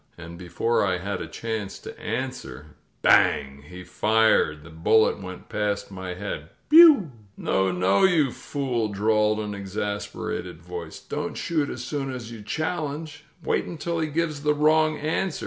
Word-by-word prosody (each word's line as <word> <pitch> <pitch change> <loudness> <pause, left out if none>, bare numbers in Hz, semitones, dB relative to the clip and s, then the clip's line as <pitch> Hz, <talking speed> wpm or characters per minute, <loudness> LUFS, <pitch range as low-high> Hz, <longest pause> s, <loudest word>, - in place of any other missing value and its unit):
And 85 0 -9
before 90 +7 0
I 95 -2 +1
had 100 +3 -4
a - - -5
chance 110 +2 -5
to - - -10
answer, 110 - -5 0.3
BANG! 70 +1 +3
He 90 0 -9
fired. 105 -5 +2
The 80 - -13
bullet 100 +8 +3
went 95 -1 -9
past 105 -1 -2
my 95 -1 -6
head. 90 -5 -6 0.2
Bioul 305 - +8 0.3
"No, 95 0 +1
no, 90 +2 +2
you 160 -8 +3
fool," 125 -6 -2
drawled 105 +1 +1
an 105 -1 -4
exasperated 100 -3 -4
voice. 85 -1 -8
"Don't - - -5
shoot 155 -4 -1
as 125 - -6
soon 135 0 -3
as 120 -3 -7
you 115 -2 -9
challenge! 155 +2 -4 0.2
Wait - - 0
imtil 170 0 -3
he - - -1
gives 155 -1 -2
the 150 0 +2
wrong 155 +1 +3
answer! 160 +3 -1
110 Hz, 155 wpm, -25 LUFS, 95-150 Hz, 0.3 s, Bioul